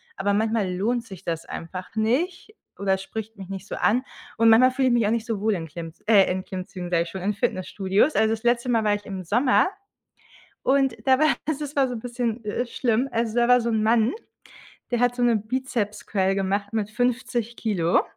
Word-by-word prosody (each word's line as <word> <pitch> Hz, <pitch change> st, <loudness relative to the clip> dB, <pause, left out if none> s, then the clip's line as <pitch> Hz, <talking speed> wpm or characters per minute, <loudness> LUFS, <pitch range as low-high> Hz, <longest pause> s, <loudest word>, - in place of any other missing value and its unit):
aber 200 Hz, 0 st, 0 dB
manchmal 215 Hz, -2 st, +1 dB
lohnt 230 Hz, +6 st, 0 dB
sich 190 Hz, -6 st, -11 dB
das 165 Hz, -1 st, -3 dB
einfach 185 Hz, +4 st, -7 dB
nicht 315 Hz, -, 0 dB, 0.3 s
oder 195 Hz, -1 st, +1 dB
spricht 220 Hz, +3 st, -7 dB
mich 190 Hz, -1 st, -9 dB
nicht 195 Hz, 0 st, -7 dB
so -, -, -5 dB
an. 245 Hz, +5 st, +2 dB, 0.3 s
Und 230 Hz, 0 st, +5 dB
manchmal 255 Hz, +3 st, +6 dB
fühle 260 Hz, 0 st, +1 dB
ich 245 Hz, -, +3 dB
mich 235 Hz, -3 st, +3 dB
auch -, -, +1 dB
nicht 230 Hz, -1 st, -1 dB
so 220 Hz, -4 st, -2 dB
wohl 215 Hz, 0 st, +2 dB
in 165 Hz, -2 st, -5 dB
Klimm 165 Hz, +1 st, -7 dB, 0.2 s
äh, 200 Hz, -4 st, +5 dB
in 185 Hz, 0 st, -2 dB
Klimmzügen, 185 Hz, -2 st, -6 dB
sage 170 Hz, -1 st, +2 dB
ich 170 Hz, -, -9 dB
schon, 190 Hz, +1 st, -6 dB
in 205 Hz, +2 st, 0 dB
Fitnessstudios. 195 Hz, +6 st, 0 dB
Also, 220 Hz, -, +3 dB
das 225 Hz, +1 st, -5 dB
letzte 240 Hz, +1 st, +1 dB
Mal 230 Hz, -2 st, +2 dB
war 210 Hz, -1 st, +2 dB
ich 205 Hz, -, -8 dB
im 190 Hz, -2 st, -6 dB
Sommer 250 Hz, -, +3 dB, 1.0 s
und 270 Hz, -2 st, +2 dB
da 260 Hz, 0 st, +5 dB
war 310 Hz, -, +4 dB, 0.2 s
das 310 Hz, -2 st, -2 dB, 0.2 s
war 270 Hz, -1 st, +4 dB
so 250 Hz, -, -4 dB
'n 225 Hz, -, -5 dB
bisschen, 240 Hz, -1 st, -3 dB
äh, 215 Hz, +4 st, -2 dB
schlimm. 240 Hz, +2 st, 0 dB
Also, 230 Hz, 0 st, -1 dB
da 240 Hz, 0 st, +4 dB
war 250 Hz, 0 st, +6 dB
so 235 Hz, 0 st, -1 dB
ein 220 Hz, -1 st, +1 dB
Mann, 225 Hz, +1 st, +3 dB, 0.8 s
der 240 Hz, -, 0 dB
hat 245 Hz, 0 st, +3 dB
so 245 Hz, -, -2 dB
'ne 240 Hz, -2 st, +4 dB
Bizepscurl 210 Hz, -4 st, -1 dB
gemacht 200 Hz, +1 st, -1 dB
mit 210 Hz, -2 st, -1 dB
50 240 Hz, -1 st, -1 dB
Kilo 180 Hz, -7 st, +1 dB
220 Hz, 215 wpm, -24 LUFS, 195-245 Hz, 1.0 s, manchmal